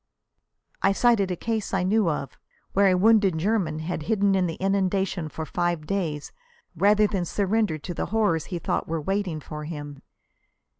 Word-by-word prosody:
I 195 - +3
cited 220 -3 +3
a 180 - -1
case 220 +1 -2
I 185 - +1
knew 200 0 +2
of, 145 -3 -3 0.4
where 200 0 +4
a 185 -1 +4
wounded 200 -3 +4
German 180 -3 0
had 160 0 -3
hidden 200 -2 +3
in 185 -2 +2
the 165 - -4
inundation 190 -3 0
for 160 +2 -5
five 175 -2 -1
days 160 -6 -3 0.4
rather 205 +5 +4
than 195 -3 -1
surrender 200 -1 0
to 165 +4 -6
the - - -3
horrors 205 -8 +1
he 180 - -4
thought 170 - -2
were 165 0 -2
waiting 190 0 -2
for 150 0 -7
him. 145 -3 -7
185 Hz, 170 wpm, -25 LUFS, 160-200 Hz, 0.4 s, where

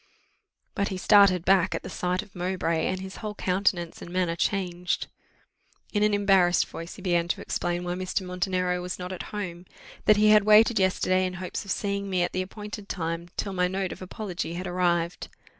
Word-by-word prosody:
But 200 - 0
he 190 - -4
started 185 -2 +5
back 190 -1 +4
at - - -4
the - - -6
sight 180 +1 -1
of 200 - -19
Mowbray, 175 -3 -1
and 185 - -2
his 190 0 -8
whole 210 -2 -5
countenance 180 -3 0
and - - -8
manner 180 -2 0
changed. 180 -1 -1 0.9
In 205 - +1
an 210 0 +4
embarrassed 190 -3 +4
voice, 165 +1 -8
he 190 - -12
began 175 -2 +1
to - - -2
explain 175 0 -2
why 175 0 -2
Mr. 185 +1 -2
Montenero 180 0 -1
was 180 +1 -4
not 180 0 -6
at 185 - -5
home; 185 -4 -6 0.4
that 215 - +6
he 210 0 +5
had 210 -1 +7
waited 215 +1 +6
yesterday 185 0 +2
in 185 0 -2
hopes 185 +2 -5
of - - -11
seeing 200 0 -2
me 185 -2 +1
at 175 - -1
the 185 - 0
appointed 210 +2 -8
time, 165 -1 -3
till 200 - -2
my 180 -1 +2
note 190 0 -2
of - - -9
apology 185 -3 -5
had 180 +2 -4
arrived. 175 -1 0
185 Hz, 200 wpm, -26 LUFS, 175-200 Hz, 0.9 s, had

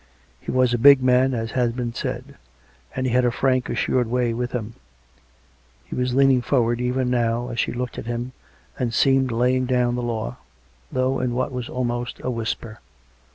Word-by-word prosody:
He - - -10
was 130 -1 +2
a 120 - +1
big 140 +1 +7
man, 130 +1 +3
as 115 -1 -3
has 120 -2 +1
been 120 -1 -3
said; - - -5 0.6
and 130 - -1
he 130 - 0
had 125 0 +4
a 120 - +3
frank 130 +1 0
assured 125 -2 0
way 120 0 0
with 125 +1 -3
him; 115 -2 -4 1.1
he - - -9
was 125 0 -1
leaning 135 -2 +4
forward, 120 -2 +1
even 125 0 0
now, 120 0 0
as 120 -1 -4
she - - +1
looked 125 -1 -4
at - - -8
him, 120 +1 -3 0.5
and 120 -3 -1
seemed 135 -1 +3
laying 125 +2 +1
down 125 -1 +2
the 125 - -2
law, 115 - -3 0.5
though 130 +1 0
in 125 -1 -1
what 130 +2 -1
was 125 -2 -5
almost 120 -1 -3
a 130 - -2
whisper. 115 -1 -4
125 Hz, 190 wpm, -23 LUFS, 120-130 Hz, 1.1 s, big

